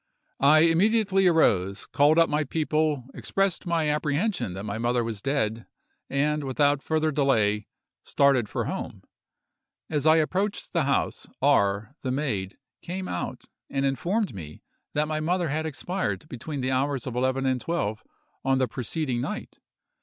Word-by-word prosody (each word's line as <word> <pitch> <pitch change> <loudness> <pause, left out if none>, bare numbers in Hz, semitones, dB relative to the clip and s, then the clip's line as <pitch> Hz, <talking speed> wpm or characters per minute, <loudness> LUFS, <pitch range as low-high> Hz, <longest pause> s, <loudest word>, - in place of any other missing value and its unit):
I 150 +3 +6
immediately 195 +3 +3
arose, 100 - +2
called 145 +3 +3
up 165 -1 +6
my 150 +1 0
people, 155 -2 0
expressed 195 -2 -1
my 165 -2 +1
apprehension 150 - 0
that 95 - -6
my 105 +1 -4
mother 120 +1 +1
was 115 -3 -4
dead, 115 -5 -1 0.4
and, 150 +2 0
without 145 +1 +2
further 155 +1 0
delay, 110 -8 +2 0.4
started 135 -6 +3
for - - -2
home. - - -5 0.9
As 150 -1 +1
I 155 - +7
approached 190 +6 -1
the 165 -5 +2
house, 140 - -1
R——, 100 +4 +2
the 130 - -3
maid, 110 -9 -2 0.2
came 185 +2 -5
out 90 - -4 0.2
and 135 0 0
informed 180 - 0
me 75 -6 -9 0.3
that 150 +1 +1
my 155 0 -1
mother 175 +1 0
had 155 +2 -1
expired 175 +1 -3
between 140 +2 -5
the 130 +1 -1
hours 135 +1 0
of 125 -3 -5
11 130 +2 0
and 130 -2 +1
12 110 -9 -2 0.4
on 135 0 +2
the 130 -1 +2
preceding 125 +2 -2
night. - - -5
145 Hz, 155 wpm, -26 LUFS, 125-160 Hz, 0.9 s, I